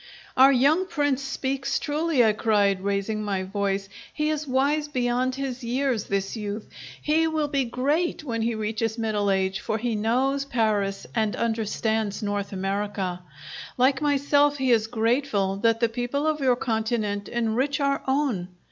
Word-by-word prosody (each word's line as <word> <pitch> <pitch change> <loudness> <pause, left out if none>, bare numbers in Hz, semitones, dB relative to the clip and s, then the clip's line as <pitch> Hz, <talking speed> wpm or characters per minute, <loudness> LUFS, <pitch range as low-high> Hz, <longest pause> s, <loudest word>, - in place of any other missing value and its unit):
"Our 265 +2 +7
young 290 +8 +3
Prince 290 -6 0
speaks 270 0 -2
truly," 300 -4 +1
I 215 - +4
cried, 205 -3 +2
raising 200 +2 -1
my 195 -2 -1
voice. 195 0 -2 0.2
"He 300 0 -1
is 305 -1 -3
wise 285 +3 +1
beyond 255 -1 0
his 265 -2 -4
years, 245 -2 0
this 195 +1 -2
youth! 210 -1 -5 0.3
He 320 +2 +2
will 310 -2 0
be 280 -2 0
great 290 +9 0
when 230 -5 -2
he 230 0 0
reaches 220 +1 -2
middle 215 -3 0
age, 190 0 +1
for 220 - -2
he 235 +1 -2
knows 255 +6 +1
Paris 215 -6 0
and 220 -3 0
understands 220 -2 -1
North 205 -1 -2
America! 195 -1 -2 0.6
Like 265 +2 +3
myself, 290 0 +3
he 265 -2 +1
is 225 -2 +3
grateful 225 -4 0
that 225 +2 +2
the 230 - +4
people 245 +5 -2
of 310 -1 +1
your 260 -3 +3
continent 220 -3 -1
enrich 240 +5 0
our 280 -1 +1
own! 265 -10 0
235 Hz, 155 wpm, -25 LUFS, 210-275 Hz, 0.6 s, Our